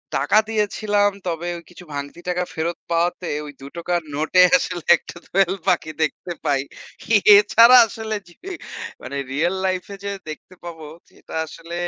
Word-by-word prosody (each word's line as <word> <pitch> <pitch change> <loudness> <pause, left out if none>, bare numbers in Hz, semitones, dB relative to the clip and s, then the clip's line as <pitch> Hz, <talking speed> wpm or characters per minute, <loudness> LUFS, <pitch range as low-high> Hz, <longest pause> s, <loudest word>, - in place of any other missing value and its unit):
টাকা 215 - +2
দিয়েছিলাম 210 -1 +1 0.2
তবে 175 0 -3
ও - - -8
কিছু 180 0 -13
ভাঙতি 145 +4 -6
টাকা 180 0 0
ফেরত 165 +2 -2
পাওয়াতে 175 +1 0 0.2
ওই 145 - -8
২ - - -9
টাকার 175 0 -1
নোটে 160 +5 +3 0.2
আসলে 175 -9 -4
১ - - -8
টা - - -8
দোয়েল 190 0 +2
পাখি 155 - +1
দেখতে 155 +3 -3
পাই। 140 -2 +2 0.8
এছাড়া 230 +4 +7
আসলে 220 0 -5
জি, 175 - -17 0.7
মানে 140 - -6
রিয়াল 170 +7 0
লাইফ 185 -1 0
এ - - -6
যে 200 - -2 0.2
দেখতে 155 +4 -10
পাবো 165 -3 -8 0.2
সেটা - - -15
আসলে 165 +2 -11
175 Hz, 160 wpm, -21 LUFS, 160-195 Hz, 0.8 s, এছাড়া